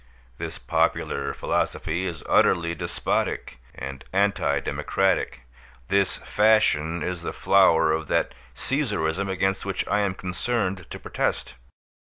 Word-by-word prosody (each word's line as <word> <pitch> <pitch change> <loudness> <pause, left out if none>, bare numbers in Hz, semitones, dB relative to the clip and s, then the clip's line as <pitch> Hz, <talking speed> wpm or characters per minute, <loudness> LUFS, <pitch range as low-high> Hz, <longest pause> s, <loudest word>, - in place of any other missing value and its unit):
This - - -5
popular - - 0
philosophy 90 +4 -1
is 85 -3 -6
utterly 85 -1 +3
despotic 70 -5 -2 0.2
and 70 0 -6
anti 100 +1 +2
democratic; 95 -8 0 0.5
this 100 -1 +2
fashion 105 -7 +2
is 90 -2 -3
the - - -3
flower 85 -5 +4
of 80 0 -1
that - - +1 0.2
Caesarism 100 - -1
against 95 +1 0
which 95 -1 -2
I 105 - +2
am 100 -3 0
concerned 95 0 -2
to - - -6
protest. - - -2
95 Hz, 120 wpm, -25 LUFS, 80-100 Hz, 0.5 s, flower